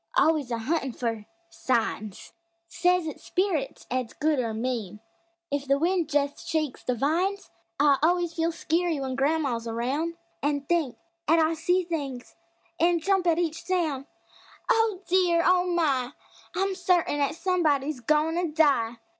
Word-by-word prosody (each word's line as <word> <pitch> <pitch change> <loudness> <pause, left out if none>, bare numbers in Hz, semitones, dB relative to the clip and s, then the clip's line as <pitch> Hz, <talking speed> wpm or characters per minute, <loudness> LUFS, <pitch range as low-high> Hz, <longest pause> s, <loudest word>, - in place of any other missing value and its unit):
Always 310 -5 +3
a 235 - -1
huntin' 270 +2 -1
fer 225 -3 -3 0.3
"signs"; 220 -5 -2 0.3
Says 360 0 +2
it's 310 - -7
"spirits" 360 -8 -1
'at's 255 -2 -2
good, 305 -2 +1
or 230 -3 -1
mean, 220 -3 -3 0.5
If 285 -1 -2
the 275 +1 +3
wind 340 +1 +1
jest 285 -1 -1
shakes 310 -5 -1
the 250 - 0
vines! 345 - 0 0.3
I 285 -1 +4
always 345 +1 +2
feel 330 0 0
skeery 335 +1 0
w'en 265 -2 -3
gran'ma's 270 -4 0
aroun' 270 +9 -2 0.2
An' 285 0 0
think 300 -3 0 0.3
'at 325 +3 +5
I 320 0 +3
see 355 +3 +1
things, 285 -7 -5 0.4
an' 340 0 +3
jump 385 +1 +1
at 330 -1 +3
each 335 -2 -1
soun': 315 -7 -1 0.6
"Oh, 440 -4 +2
dear! 350 -2 +3
Oh, 365 0 +4
my! 290 -7 +1 0.4
I'm 390 +1 0
certain 355 -5 +1
'at 285 +1 0
somebody's 310 -6 +1
goin' 305 +6 +2
to 350 -3 -1
die!" 250 -7 +3
310 Hz, 150 wpm, -26 LUFS, 265-345 Hz, 0.6 s, at